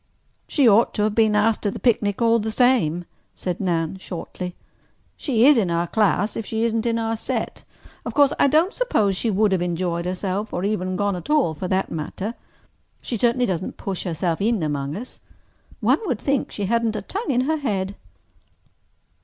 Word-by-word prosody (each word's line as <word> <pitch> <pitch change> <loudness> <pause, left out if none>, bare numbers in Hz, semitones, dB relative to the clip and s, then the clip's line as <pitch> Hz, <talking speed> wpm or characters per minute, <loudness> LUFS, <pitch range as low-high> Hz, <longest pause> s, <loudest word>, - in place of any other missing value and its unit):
"She 280 -5 +3
ought 225 +2 +4
to 210 - +1
have 215 0 +1
been 220 -1 +3
asked 215 +1 +2
to 205 - 0
the - - -5
picnic 215 -2 +1
all 230 0 +4
the 220 +1 -2
same," 215 -9 +2 0.3
said 180 -2 -3
Nan 170 -1 -1
shortly. 180 0 -6 0.6
"She 245 -5 +2
is 285 -3 +7
in 190 -5 0
our 170 0 +1
class 205 +1 +1
if 225 - -3
she 220 +1 -2
isn't 230 0 0
in 230 0 +1
our 225 0 -1
set. 220 - -4 0.4
Of - - -6
course 285 0 +5
I - - +5
don't 320 +8 +3
suppose 215 - +1
she 225 - 0
would 210 0 +2
have 190 -2 +1
enjoyed 175 0 -1
herself—or 185 +1 -2
even 185 -3 -1
gone 205 0 0
at 180 +10 -8
all, 295 - +3
for 180 +4 -5
that 190 +1 0
matter. 185 +7 -4 0.7
She 245 - -4
certainly 240 +3 +2
doesn't 185 -4 -3
push 195 -2 -3
herself 170 0 -2
in 220 -3 +1
among 145 -1 -2
us. 240 +6 -8 0.6
One - - +3
would 255 - 0
think 275 +3 -1
she 205 - -3
hadn't 230 +1 +1
a 210 - -4
tongue 405 - -4
in 250 -2 +2
her 315 +4 0
head." 200 -9 -2
210 Hz, 190 wpm, -23 LUFS, 185-235 Hz, 0.7 s, is